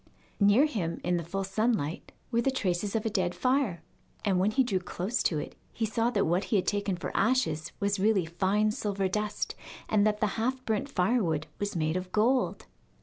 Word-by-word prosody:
Near 205 Hz, +7 st, +6 dB
him, 190 Hz, -, -2 dB
in 180 Hz, 0 st, +1 dB
the 170 Hz, -, -3 dB
full 195 Hz, +4 st, -3 dB
sunlight, 195 Hz, -5 st, -1 dB, 0.2 s
were 235 Hz, -1 st, +2 dB
the 270 Hz, -, +2 dB
traces 200 Hz, -5 st, -1 dB
of 225 Hz, -, 0 dB
a -, -, +2 dB
dead 185 Hz, -4 st, 0 dB
fire, 255 Hz, -, +1 dB, 0.4 s
and 190 Hz, -3 st, +2 dB
when 190 Hz, +3 st, +3 dB
he 240 Hz, +5 st, +3 dB
drew 200 Hz, -7 st, 0 dB
close 190 Hz, +5 st, -2 dB
to 160 Hz, -, +1 dB
it 150 Hz, -, -5 dB, 0.2 s
he 225 Hz, -, -1 dB
saw 225 Hz, +2 st, +1 dB
that 205 Hz, -5 st, +1 dB
what 175 Hz, +4 st, +1 dB
he -, -, 0 dB
had 190 Hz, -, +2 dB
taken 200 Hz, -2 st, 0 dB
for -, -, -5 dB
ashes 195 Hz, -9 st, +1 dB
was 200 Hz, 0 st, 0 dB
really 200 Hz, -3 st, +3 dB
fine 195 Hz, +6 st, +1 dB
silver 200 Hz, -3 st, -1 dB
dust, 210 Hz, +2 st, -2 dB, 0.3 s
and 210 Hz, -1 st, +3 dB
that 210 Hz, 0 st, 0 dB
the 215 Hz, -, +2 dB, 0.2 s
half 255 Hz, +2 st, -1 dB
burnt 220 Hz, +5 st, -1 dB
firewood 180 Hz, -, +1 dB
was 205 Hz, -1 st, -2 dB
made 155 Hz, 0 st, 0 dB
of 185 Hz, 0 st, -5 dB
gold. 245 Hz, +4 st, +1 dB
205 Hz, 205 wpm, -29 LUFS, 180-225 Hz, 0.4 s, Near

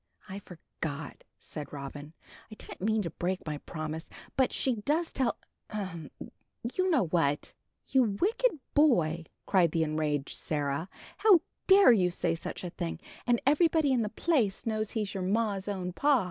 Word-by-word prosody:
"I 195 Hz, 0 st, -6 dB
forgot," 160 Hz, -5 st, -7 dB, 0.2 s
said 150 Hz, -3 st, -7 dB
Robin, 145 Hz, +2 st, -8 dB, 0.4 s
"I -, -, -8 dB
didn't -, -, -9 dB
mean 220 Hz, +1 st, +1 dB
to 170 Hz, -, -4 dB
break 180 Hz, +3 st, -2 dB
my 150 Hz, -2 st, -3 dB
promise. 155 Hz, +1 st, -5 dB, 0.3 s
But 260 Hz, -1 st, +3 dB
she 255 Hz, -3 st, 0 dB
does 305 Hz, +10 st, 0 dB
tell 260 Hz, -4 st, 0 dB, 0.3 s
ahem! 185 Hz, -8 st, -5 dB, 0.6 s
you 370 Hz, 0 st, +1 dB
know 295 Hz, -, +3 dB
what." 155 Hz, -4 st, 0 dB, 0.3 s
"You 240 Hz, -7 st, +2 dB
wicked 450 Hz, -1 st, +2 dB, 0.2 s
boy!" 170 Hz, -, +3 dB, 0.2 s
cried 180 Hz, -4 st, +4 dB
the 165 Hz, -, +2 dB
enraged 150 Hz, -2 st, -1 dB
Sarah; 145 Hz, +3 st, -2 dB, 0.3 s
"how 400 Hz, -5 st, +6 dB, 0.3 s
dare 390 Hz, -5 st, +8 dB
you 185 Hz, -6 st, +4 dB
say 175 Hz, -1 st, 0 dB
such 165 Hz, -, -6 dB
a 175 Hz, -, -4 dB
thing, 80 Hz, -, -4 dB, 0.3 s
and 240 Hz, -1 st, +4 dB
everybody 310 Hz, 0 st, +4 dB
in 245 Hz, -, +2 dB
the 210 Hz, -, -1 dB
place 225 Hz, -, +1 dB
knows 215 Hz, -2 st, -1 dB
he's 210 Hz, -4 st, -2 dB
your 195 Hz, -, -3 dB
ma's 200 Hz, 0 st, 0 dB
own 185 Hz, -3 st, -3 dB
pa." 280 Hz, +5 st, +4 dB
195 Hz, 160 wpm, -30 LUFS, 160-255 Hz, 0.6 s, dare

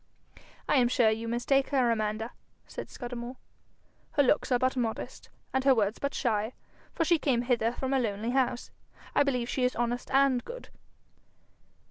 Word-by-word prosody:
'I -, -, +3 dB
am 245 Hz, -2 st, +5 dB
sure 240 Hz, -2 st, +3 dB
you 225 Hz, +1 st, -3 dB
mistake 255 Hz, +4 st, +1 dB
her, 255 Hz, -4 st, +3 dB
Amanda,' 215 Hz, +1 st, -1 dB, 0.3 s
said -, -, -8 dB
Scudamore. 245 Hz, 0 st, -6 dB, 0.8 s
'Her 285 Hz, -, +4 dB
looks 275 Hz, +1 st, +2 dB
are 250 Hz, -, +5 dB
but 255 Hz, +1 st, +1 dB
modest, 235 Hz, -3 st, -3 dB, 0.2 s
and 265 Hz, 0 st, +1 dB
her 270 Hz, -1 st, +5 dB
words 210 Hz, -1 st, 0 dB
but 280 Hz, 0 st, -2 dB
shy, 220 Hz, -2 st, 0 dB, 0.4 s
for 330 Hz, -, 0 dB
she 335 Hz, 0 st, +3 dB
came 250 Hz, -5 st, +1 dB
hither 240 Hz, -2 st, +1 dB
from 265 Hz, +2 st, -2 dB
a 270 Hz, -, +3 dB
lonely 220 Hz, 0 st, -1 dB
house. 250 Hz, -2 st, 0 dB, 0.4 s
I -, -, +4 dB
believe 250 Hz, -4 st, +1 dB
she 255 Hz, -, -1 dB
is 250 Hz, -, +1 dB
honest 240 Hz, +1 st, -2 dB
and 270 Hz, -2 st, +3 dB
good.' -, -, -9 dB
245 Hz, 170 wpm, -29 LUFS, 230-265 Hz, 0.8 s, am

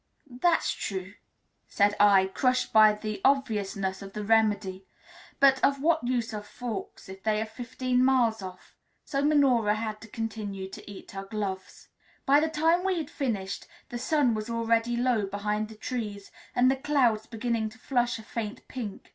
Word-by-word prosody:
"That's 330 Hz, +8 st, +2 dB
true," 190 Hz, -1 st, -5 dB, 0.5 s
said 205 Hz, 0 st, +2 dB
I, 200 Hz, -2 st, +6 dB
crushed 255 Hz, +6 st, 0 dB
by 215 Hz, -1 st, +7 dB
the 210 Hz, -1 st, -5 dB
obviousness 205 Hz, -8 st, 0 dB
of 195 Hz, -1 st, -9 dB
the 210 Hz, -, -4 dB
remedy; 205 Hz, -3 st, +2 dB, 0.6 s
but 270 Hz, -1 st, +5 dB
of 275 Hz, 0 st, +3 dB
what 320 Hz, +1 st, +2 dB
use 240 Hz, -3 st, -1 dB
are 210 Hz, -, -4 dB
forks 220 Hz, -1 st, -7 dB
if 190 Hz, 0 st, -10 dB
they 215 Hz, 0 st, +1 dB
are 220 Hz, -, -1 dB
fifteen 250 Hz, +2 st, -1 dB
miles 240 Hz, -5 st, +3 dB
off? 185 Hz, -1 st, -10 dB, 0.3 s
So 275 Hz, 0 st, -1 dB
Minora 260 Hz, -8 st, +3 dB
had 215 Hz, -1 st, -4 dB
to 225 Hz, -, -11 dB
continue 210 Hz, -3 st, -5 dB
to 190 Hz, -, -11 dB
eat 200 Hz, -, -10 dB
her 195 Hz, 0 st, -6 dB
gloves. 195 Hz, -2 st, -5 dB, 0.4 s
By 285 Hz, +1 st, +6 dB
the 320 Hz, +1 st, +1 dB
time 325 Hz, +3 st, +2 dB
we 380 Hz, -2 st, +1 dB
had 310 Hz, -4 st, -4 dB
finished, 205 Hz, -8 st, -3 dB, 0.2 s
the 240 Hz, -, -5 dB
sun 280 Hz, -2 st, +2 dB
was 215 Hz, +1 st, -4 dB
already 230 Hz, +1 st, +1 dB
low 240 Hz, -4 st, +1 dB
behind 210 Hz, +2 st, -2 dB
the 220 Hz, -, -11 dB
trees 210 Hz, -3 st, -5 dB, 0.2 s
and 255 Hz, +1 st, +5 dB
the 270 Hz, -, 0 dB
clouds 255 Hz, -6 st, +1 dB
beginning 230 Hz, -1 st, -2 dB
to 220 Hz, -, -16 dB
flush 245 Hz, -1 st, 0 dB
a 220 Hz, -, -10 dB
faint 215 Hz, -1 st, -6 dB
pink. 225 Hz, -6 st, -7 dB
225 Hz, 170 wpm, -28 LUFS, 205-255 Hz, 0.6 s, by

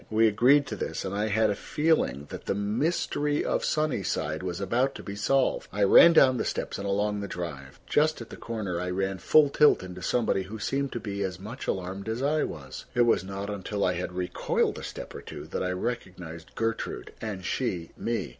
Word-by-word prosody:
We 110 Hz, +1 st, +4 dB
agreed 130 Hz, +7 st, +5 dB
to 110 Hz, -, -5 dB
this, 100 Hz, -, -4 dB
and 95 Hz, -, -3 dB
I 105 Hz, +2 st, 0 dB
had 110 Hz, 0 st, +2 dB
a -, -, -1 dB
feeling 150 Hz, -, 0 dB
that -, -, -8 dB
the -, -, +1 dB
mystery 145 Hz, -, 0 dB
of -, -, 0 dB
Sunnyside 100 Hz, -, -1 dB
was 90 Hz, -1 st, -4 dB
about 125 Hz, +8 st, +1 dB
to -, -, -8 dB
be 100 Hz, -, -6 dB
solved. 130 Hz, +6 st, +1 dB
I 105 Hz, 0 st, 0 dB
ran 170 Hz, +12 st, +8 dB
down 130 Hz, -5 st, +6 dB
the -, -, 0 dB
steps -, -, -3 dB
and 100 Hz, -, -3 dB
along 105 Hz, +1 st, 0 dB
the 100 Hz, -, -4 dB
drive. 70 Hz, -8 st, -6 dB
Just 155 Hz, +1 st, +2 dB
at 115 Hz, -, -9 dB
the -, -, -7 dB
corner 100 Hz, -7 st, -4 dB
I 90 Hz, -, -2 dB
ran 95 Hz, +1 st, -1 dB
full 150 Hz, -, +5 dB
tilt 150 Hz, -7 st, +4 dB
into 90 Hz, 0 st, -8 dB
somebody 115 Hz, -4 st, +1 dB
who 100 Hz, +4 st, -7 dB
seemed 135 Hz, +6 st, -1 dB
to 120 Hz, -, -2 dB
be 100 Hz, -2 st, -4 dB
as 95 Hz, -3 st, -2 dB
much 110 Hz, +7 st, -7 dB
alarmed 95 Hz, +3 st, -3 dB
as 115 Hz, +4 st, -2 dB
I 150 Hz, +2 st, +2 dB
was. 65 Hz, -5 st, -8 dB
It 120 Hz, -, +4 dB
was 115 Hz, -6 st, +3 dB
not 100 Hz, +2 st, -5 dB
until 100 Hz, 0 st, -2 dB
I 90 Hz, -, +2 dB
had 90 Hz, 0 st, -4 dB
recoiled 90 Hz, 0 st, 0 dB
a -, -, -9 dB
step -, -, -7 dB
or -, -, -7 dB
two -, -, -8 dB
that -, -, -4 dB
I 90 Hz, -, 0 dB
recognized 90 Hz, -5 st, -5 dB
Gertrude, 115 Hz, 0 st, -3 dB
and 100 Hz, -5 st, -5 dB
she 90 Hz, -7 st, -2 dB
me. 115 Hz, 0 st, -2 dB
100 Hz, 215 wpm, -28 LUFS, 90-120 Hz, -, ran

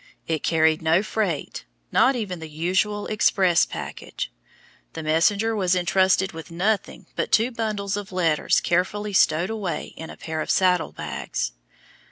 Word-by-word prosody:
It 160 Hz, -2 st, -1 dB
carried 160 Hz, -1 st, +2 dB
no 160 Hz, +4 st, +3 dB
freight, 200 Hz, -9 st, -2 dB, 0.3 s
not 270 Hz, -, +4 dB
even 200 Hz, -7 st, -4 dB
the 160 Hz, -1 st, -8 dB
usual 185 Hz, +6 st, 0 dB
express 190 Hz, -4 st, +3 dB
package. -, -, -6 dB, 0.6 s
The 160 Hz, -, -6 dB
messenger 200 Hz, +8 st, +2 dB
was 185 Hz, -3 st, +2 dB
intrusted 190 Hz, +1 st, +2 dB
with 160 Hz, +1 st, -9 dB
nothing 195 Hz, +5 st, -1 dB
but -, -, -2 dB
two 230 Hz, +3 st, +3 dB
bundles 210 Hz, -4 st, -2 dB
of 205 Hz, -1 st, -6 dB
letters 165 Hz, -4 st, +2 dB
carefully 205 Hz, +4 st, 0 dB
stowed 170 Hz, +1 st, +3 dB
away 205 Hz, -6 st, -4 dB
in 160 Hz, -, -8 dB
a -, -, -10 dB
pair 160 Hz, -1 st, -4 dB
of -, -, -5 dB
saddle 180 Hz, -2 st, +2 dB
bags. -, -, -4 dB
185 Hz, 150 wpm, -24 LUFS, 165-205 Hz, 0.6 s, not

